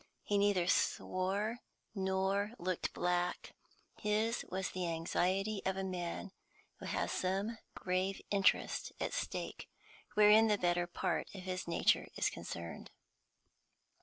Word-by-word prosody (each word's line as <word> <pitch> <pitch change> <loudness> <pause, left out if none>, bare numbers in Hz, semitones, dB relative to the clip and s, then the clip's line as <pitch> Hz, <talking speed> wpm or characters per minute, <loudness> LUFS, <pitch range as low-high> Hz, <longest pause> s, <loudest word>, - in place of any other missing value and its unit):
He 205 -1 +1
neither 200 -3 +3
swore 195 +5 +1 0.3
nor 195 +2 0
looked 180 0 -2
black; 180 0 -1 0.5
his 215 +3 +1
was 190 0 -2
the 185 -1 -2
anxiety 185 +5 0
of 190 0 0
a 195 - -1
man 185 +1 -3 0.5
who - - -6
has - - -1
some 195 +5 -1 0.2
grave 185 +1 -1
interest 200 -1 +2
at - - -2
stake - - -4 0.5
wherein 215 +1 +7
the 210 -1 +3
better 175 -1 +1
part 175 - -1
of 190 - -7
his 185 -1 -3
nature 170 - +3
is - - +1
concerned. 85 0 -6
190 Hz, 125 wpm, -35 LUFS, 180-205 Hz, 0.5 s, wherein